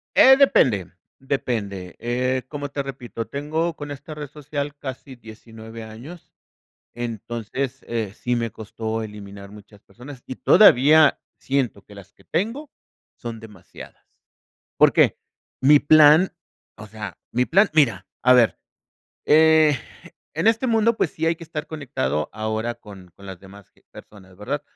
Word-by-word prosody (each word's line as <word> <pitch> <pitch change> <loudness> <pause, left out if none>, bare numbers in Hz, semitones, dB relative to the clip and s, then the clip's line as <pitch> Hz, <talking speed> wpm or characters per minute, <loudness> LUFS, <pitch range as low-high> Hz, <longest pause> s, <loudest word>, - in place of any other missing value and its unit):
Eh, 265 +1 +8
depende 110 - +3 0.3
depende. 100 -9 -4
Eh, 125 +2 -1
como 145 -1 -5
te 140 - -3
repito, 125 -4 -7
tengo 160 +4 -3
con 145 -1 -8
esta 145 +2 -9
red 150 -1 -7
social 145 0 -6
casi 130 -1 -8
19, 115 0 -12
años. 120 +11 -12 0.6
Entonces, 120 +2 -5
eh, 110 -4 -3
sí 125 +2 -2
me 115 -2 -2
costó 110 +1 -5
eliminar 100 -2 -10
muchas 105 0 -16
personas 125 +6 -13
y 130 - -6
todavía 155 - +5 0.2
siento 130 -6 -2
que 105 - -16
las 100 -1 -14
que - - -24
tengo 230 - -3 0.5
son 115 -1 -7
demasiadas, 105 -5 -14 0.7
¿por - - +6
qué? - - +3 0.4
Mi 145 +2 +6
plan, 155 +4 +6 0.4
o 110 - -11
sea, 105 -2 -9
mi 125 +1 +1
plan 195 +4 +4
mira, 115 -12 +2 0.2
a 125 - +5
ver, 115 -7 +3 0.7
eh, 155 -2 +5 0.6
en 165 +5 -2
este 230 +3 +1
mundo, 230 -1 +2
pues 165 - 0
sí 160 - -5
hay 165 +1 +1
que 165 - -11
estar 150 -1 -6
conectado 120 - -3
ahora 110 +2 -3
con 95 -5 -14
con 100 - -14
las 95 -2 -9
demás, 100 0 -15
eh, - - -28
personas, 95 -3 -15
¿verdad? 140 +9 -4
125 Hz, 150 wpm, -22 LUFS, 110-150 Hz, 0.7 s, Eh